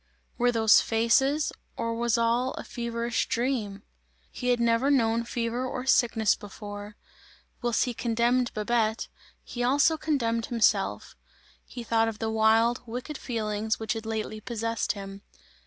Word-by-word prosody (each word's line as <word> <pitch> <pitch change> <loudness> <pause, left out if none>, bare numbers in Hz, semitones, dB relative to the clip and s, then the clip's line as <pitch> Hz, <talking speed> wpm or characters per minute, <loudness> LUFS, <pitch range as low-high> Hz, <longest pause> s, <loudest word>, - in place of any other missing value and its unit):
Were 245 0 +3
those 220 -2 +5
faces, 265 +6 +2 0.2
or 230 0 -2
was 235 0 +1
all 235 +3 +1
a - - -6
feverish 235 -1 -2
dream? 225 -5 -2 0.5
He 250 - -5
had 245 -1 +3
never 235 +3 +2
known 230 -4 +2
fever 235 +1 -2
or 255 0 -4
sickness 230 -5 +3
before. 205 0 -9 0.7
Whilst 240 -2 +1
he 245 - -2
condemned 235 +2 +1
Babette, 220 +1 0 0.3
he 245 - -6
also 285 +6 +3
condemned 230 -8 -1
himself. 230 -3 +1 0.5
He 245 - -7
thought 225 0 +2
of 225 -2 -4
the 220 0 -2
wild, 225 +2 +3
wicked 250 +6 -6
feelings 220 -2 -2
which 220 -1 -1
had 225 -1 -6
lately 215 -1 -4
possessed 230 0 -2
him. 195 -1 -8
230 Hz, 140 wpm, -27 LUFS, 220-245 Hz, 0.7 s, those